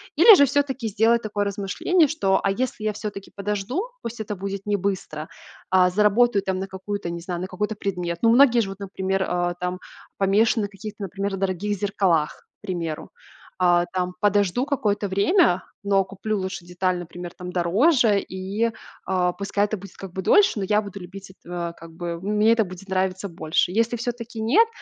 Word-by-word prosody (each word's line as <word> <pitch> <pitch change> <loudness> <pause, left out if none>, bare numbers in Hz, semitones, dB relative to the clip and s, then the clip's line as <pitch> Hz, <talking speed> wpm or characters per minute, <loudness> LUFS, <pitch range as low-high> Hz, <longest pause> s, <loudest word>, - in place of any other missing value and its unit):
Или 395 +7 +9
же 285 - +6
всё-таки 270 -3 0
сделать 225 +3 +3
такое 205 -1 -1
размышление, 205 - +1
что, 195 -11 +1
а 195 - +2
если 235 0 -2
я 215 - 0
всё-таки 205 -2 -7
подожду, 210 - -2 0.2
пусть 230 0 -6
это 210 -1 -4
будет 195 +1 -5
не 205 - +2
быстро, 180 -5 -3 0.4
а 185 -1 +5
заработаю 210 +2 +3
там 190 -1 -1
на 195 - -3
какую-то, 190 -1 -5
не 170 0 -4
знаю, 175 0 -4
на 185 - -3
какой-то 210 +4 -3
предмет. 180 -4 -3
Ну, 230 - +4
многие 240 0 +6
же 195 - -3
вот, 195 - -7
а, - - -3
там, - - -13
например, 190 -2 -1 0.6
помешаны 205 +2 +2
в - - -23
каких-то, 205 +1 -8
например, 195 +1 -3
дорогих 195 +2 -1
зеркалах, 185 -6 0
к - - -87
примеру. 170 -6 -4 0.5
А, 175 -1 +4
там 180 -1 -1
подожду 205 +3 +2
какое-то 210 -8 0
время, 200 - +3 0.2
но 195 -1 +3
куплю 200 +2 -3
лучше 185 -2 -5
деталь, 180 +1 -1
например, 175 0 -8
там 180 0 -6
дороже, 205 - +3
и, 195 +6 -2 0.3
а, 180 -1 +1
пускай 200 +1 0
это 215 +1 -3
будет 195 0 -12
как 195 -2 -8
бы 190 - -3
дольше, 395 - +4
но 195 - -1
я 210 +2 +2
буду 200 -1 -8
любить, 190 +1 -10
эт - - -23
э, 170 -1 -3
как 165 0 -12
бы 170 0 -5
мне 210 +2 +3
это 225 -2 +2
будет 185 +1 -11
нравится 190 +1 -1
больше. 165 +1 0
Если 230 +3 +1
всё-таки 235 -1 -5
нет, 330 - +4
200 Hz, 190 wpm, -24 LUFS, 185-215 Hz, 0.6 s, Или